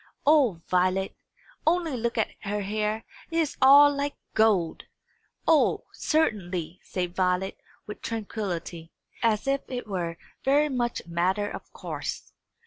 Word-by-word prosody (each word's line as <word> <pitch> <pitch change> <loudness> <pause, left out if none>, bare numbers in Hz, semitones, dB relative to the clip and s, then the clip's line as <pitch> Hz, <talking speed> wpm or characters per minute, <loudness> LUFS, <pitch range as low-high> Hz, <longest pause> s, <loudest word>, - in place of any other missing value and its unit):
"O 265 - +4
Violet, 185 +1 +1 0.5
only 330 -3 +2
look 235 -1 -2
at 220 - +1
her 205 +1 -1
hair! 215 +2 -2 0.2
It 330 - -2
is 320 -3 +1
all 285 +2 +8
like 285 +1 -2 0.2
gold!" 205 -7 +2 0.6
"O, 320 -2 +4
certainly," 185 - -1
said 180 -1 -4
Violet, 185 0 0 0.3
with 210 - -8
tranquillity, 190 -7 -4 0.3
as 220 -3 +2
if 275 0 +1
it 250 -1 -4
were 175 -5 -3 0.3
very 290 +3 +3
much 240 -3 -1
a - - -24
matter 185 +5 +1
of - - -8
course. - - -6
215 Hz, 135 wpm, -27 LUFS, 185-270 Hz, 0.6 s, all